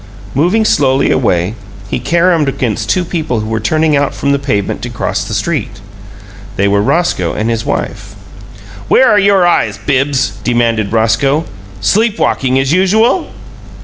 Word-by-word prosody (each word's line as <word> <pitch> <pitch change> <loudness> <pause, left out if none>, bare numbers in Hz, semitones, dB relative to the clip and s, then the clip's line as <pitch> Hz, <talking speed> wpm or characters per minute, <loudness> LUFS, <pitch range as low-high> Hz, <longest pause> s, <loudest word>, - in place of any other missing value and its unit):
Moving 180 - +1
slowly 135 -7 +2
away, 90 -6 +1 0.3
he - - -3
caromed 170 -3 +1
against 120 -5 -3
two 180 -1 +1
people 160 -8 -2
who 110 - -5
were 110 0 -2
turning 155 +7 +1
out 140 0 0
from 140 - -1
the 140 - +1
pavement 115 -8 -2
to 120 - -5
cross 115 - -3
the 110 - -5
street. 105 -3 -3 0.8
They 100 0 +1
were 100 0 +2
Roscoe 105 - 0
and 110 +2 -1
his 115 -1 -2
wife. 100 0 -4 0.7
"Where 260 - +4
are 210 - +4
your 195 -2 +3
eyes, 175 - +1
Bibbs?" 135 -7 -1
demanded 115 -4 0
Roscoe. 115 +8 +1 0.4
"Sleep 215 - +1
walking, 130 -1 0
as 135 +2 +1
usual?" 220 - +2
135 Hz, 155 wpm, -13 LUFS, 110-170 Hz, 0.8 s, Where